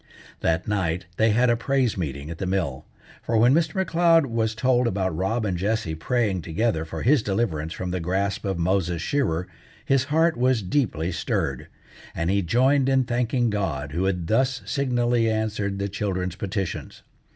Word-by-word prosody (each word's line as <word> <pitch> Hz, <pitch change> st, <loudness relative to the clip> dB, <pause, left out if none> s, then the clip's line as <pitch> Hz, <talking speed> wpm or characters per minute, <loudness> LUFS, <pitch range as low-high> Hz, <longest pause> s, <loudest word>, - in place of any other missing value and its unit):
That 80 Hz, +1 st, 0 dB
night 95 Hz, -4 st, -1 dB
they 110 Hz, 0 st, +4 dB
had 120 Hz, +3 st, +3 dB
a -, -, +3 dB
praise 130 Hz, 0 st, 0 dB
meeting 70 Hz, -3 st, -4 dB
at 85 Hz, -, -8 dB
the 95 Hz, -, -2 dB
mill; 90 Hz, -9 st, -2 dB, 0.3 s
for 115 Hz, -, 0 dB
when 120 Hz, +4 st, +5 dB
Mr. 160 Hz, 0 st, +1 dB
M'Leod 165 Hz, -2 st, +4 dB
was 115 Hz, -3 st, -1 dB
told 125 Hz, +1 st, +2 dB
about 95 Hz, -5 st, -1 dB
Rob 110 Hz, +6 st, -1 dB
and 95 Hz, -3 st, -1 dB
Jessie 105 Hz, -1 st, -1 dB
praying 100 Hz, +2 st, 0 dB
together 80 Hz, +1 st, -1 dB
for 80 Hz, 0 st, -6 dB
his 135 Hz, +2 st, +4 dB
deliverance 95 Hz, -7 st, -1 dB
from 90 Hz, 0 st, -4 dB
the 90 Hz, -, -1 dB
grasp 95 Hz, +4 st, -1 dB
of 95 Hz, -3 st, -2 dB
Moses 85 Hz, -1 st, 0 dB
Shearer 90 Hz, -, -1 dB, 0.4 s
his 135 Hz, -1 st, +2 dB
heart 160 Hz, +3 st, +2 dB
was 125 Hz, -3 st, +2 dB
deeply 90 Hz, -, 0 dB
stirred, 85 Hz, -, -2 dB, 0.5 s
and 85 Hz, +2 st, 0 dB
he 100 Hz, 0 st, +2 dB
joined 130 Hz, -, +3 dB
in 135 Hz, -1 st, +3 dB
thanking 120 Hz, -1 st, 0 dB
God 75 Hz, -9 st, -2 dB
who 85 Hz, +5 st, -1 dB
had 90 Hz, -3 st, -1 dB
thus 130 Hz, +6 st, +1 dB
signally 120 Hz, -4 st, +1 dB
answered 105 Hz, -2 st, -1 dB
the 100 Hz, 0 st, -2 dB
children's 95 Hz, -3 st, -3 dB
petitions. 95 Hz, -1 st, -4 dB
105 Hz, 175 wpm, -24 LUFS, 90-120 Hz, 0.5 s, when